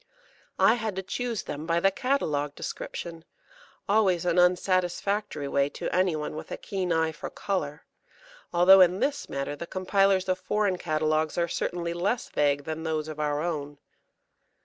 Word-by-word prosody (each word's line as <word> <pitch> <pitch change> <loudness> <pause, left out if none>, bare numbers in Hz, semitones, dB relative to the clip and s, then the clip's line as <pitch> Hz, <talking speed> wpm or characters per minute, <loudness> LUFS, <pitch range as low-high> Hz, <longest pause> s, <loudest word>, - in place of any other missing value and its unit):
I - - +6
had 220 -4 -3
to 190 - -3
choose 235 +2 -3
them 150 +2 -6
by 170 0 +2
the 195 +3 +3
catalogue 155 - -1
description 165 -1 -6 0.6
always 195 -5 +3
an 175 0 +2
unsatisfactory 185 -1 +1
way 140 0 +1
to - - -3
any 180 -2 +2
one 150 0 -4
with 155 - -7
a - - -3
keen 190 -4 -3
eye 160 -1 +2
for 150 - -7
colour, 160 -6 -3 0.7
although 180 +2 +7
in 180 +1 +4
this 285 +1 -1
matter 140 +1 -3
the 170 - -7
compilers 190 0 +2
of 185 0 0
foreign 195 -1 0
catalogues 155 -1 0
are 170 -1 +2
certainly 170 0 -2
less 195 +7 -1
vague 145 -1 +1
than 160 +2 -4
those 155 -1 -2
of 155 -1 -7
our 150 0 0
own. 145 -4 -3
175 Hz, 165 wpm, -27 LUFS, 155-190 Hz, 0.7 s, although